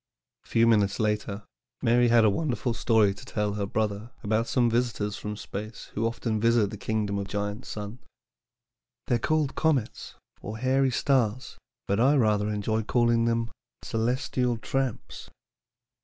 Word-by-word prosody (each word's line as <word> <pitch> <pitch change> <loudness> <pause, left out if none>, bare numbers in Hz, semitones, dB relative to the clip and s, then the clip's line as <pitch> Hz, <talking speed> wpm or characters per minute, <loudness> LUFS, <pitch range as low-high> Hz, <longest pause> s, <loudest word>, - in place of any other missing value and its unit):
A - - -21
few 115 0 +3
evenings 105 -3 +3
later 105 -1 -1 0.4
Mary 120 +1 +4
had 115 -1 +5
a - - +6
wonderful 125 -1 -1
story 110 -3 +3
to 100 - -13
tell 105 -1 -2
her 100 -1 -2
brother 105 +1 -2
about 110 +2 0
some 125 -2 +2
visitors 115 -3 0
from 105 0 -5
space 110 +2 -7
who 115 +2 0
often 115 -1 -2
visit 115 -3 +3
the 105 - -6
kingdom 105 -1 -1
of 100 - -4
Giant 105 +3 -3
Sun. 105 +3 -6 1.1
"They 120 - +2
are - - -9
called 155 +1 +1
comets, 145 -8 -1 0.3
or 105 +2 -6
hairy 130 +2 +2
stars, 130 -2 0 0.3
but 100 +2 +1
I 135 +5 +5
rather 105 -5 +2
enjoy 105 +1 -1
calling 115 +1 +2
them 115 0 0 0.3
'celestial 125 +1 0
tramps.'" 135 +1 -3
115 Hz, 155 wpm, -27 LUFS, 105-120 Hz, 1.1 s, a